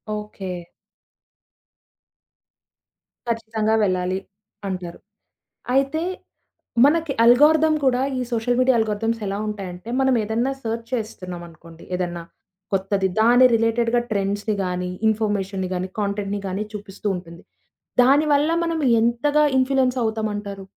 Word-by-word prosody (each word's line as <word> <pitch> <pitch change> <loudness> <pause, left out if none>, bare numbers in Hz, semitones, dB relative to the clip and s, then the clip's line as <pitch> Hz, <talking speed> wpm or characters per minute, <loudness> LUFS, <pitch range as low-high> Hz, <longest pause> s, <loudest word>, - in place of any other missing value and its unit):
Okay. 210 -2 -7 2.8
ఖచ్చితంగా 220 -1 -1
వెళ్ళాలి 185 -1 0 0.5
అంటారు. 180 -3 -5 0.7
అయితే 275 +4 +1 0.8
మనకి 315 0 +2
అల్గారిథమ్ 305 +6 +5
కూడా 255 -1 +3 0.2
ఈ - - -1
సోషల్ 235 +1 0
మీడియా 255 0 +4
అల్గారిథమ్స్ 225 +1 -1
ఎలా 195 +1 -2
ఉంటాయంటే 195 -1 -6
మనం 265 -1 +3
ఏదన్నా 230 +5 0
సెర్చ్ 230 0 -4
చేస్తున్నాంనుకోండి 175 -7 -7
ఏదన్నా, 175 -2 -3 0.5
కొత్తది. 195 0 +1
దాని 245 +3 +6
రిలేటెడ్‌గా 230 +1 +2
ట్రెండ్స్‌ని 205 +1 -1
గాని, 180 0 -2 0.2
ఇన్ఫర్మేషన్‌ని 200 -3 -1
గాని, 180 +1 -2
కాంటెంట్‌ని 200 0 -2
గాని 190 +3 -2
చూపిస్తూ 205 0 -6
ఉంటుంది. 170 -1 -10 0.6
దానివల్ల 290 +3 +4
మనం 335 -1 -1 0.2
ఎంతగా 275 +6 +2
ఇన్‌ఫ్లుయన్స్ 260 -1 +2
అవుతామంటారు? 205 -3 -3
220 Hz, 100 wpm, -22 LUFS, 195-250 Hz, 2.8 s, దాని